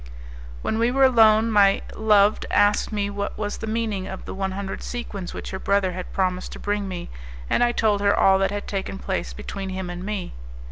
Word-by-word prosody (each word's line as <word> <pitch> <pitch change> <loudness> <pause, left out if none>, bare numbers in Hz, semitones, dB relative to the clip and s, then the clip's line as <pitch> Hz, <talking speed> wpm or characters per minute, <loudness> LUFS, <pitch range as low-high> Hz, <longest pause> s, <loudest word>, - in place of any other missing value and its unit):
When 220 - -1
we 230 +1 +3
were 270 +2 +2
alone 225 -3 +5
my 200 -2 +4
loved 210 -1 +3
asked 205 +2 +3
me 205 -1 -1
what 200 0 -4
was 205 -1 -3
the 220 - -5
meaning 215 -4 -2
of 190 -1 -7
the - - -6
one 190 0 -2
hundred 195 0 -5
sequins 205 -7 -5
which - - -7
her 190 - -4
brother 200 -2 +1
had 180 0 -7
promised 185 -1 -1
to - - -9
bring 205 -1 -2
me, 180 - -6 0.4
and - - +3
I 240 - +3
told 215 -4 +1
her 200 0 +3
all 190 0 +5
that 195 0 +2
had 205 +1 -4
taken 195 -1 -3
place 190 -1 -3
between 200 -2 -6
him 185 -1 -4
and 175 +1 -6
me. 205 -2 -4
200 Hz, 215 wpm, -24 LUFS, 190-215 Hz, 0.4 s, alone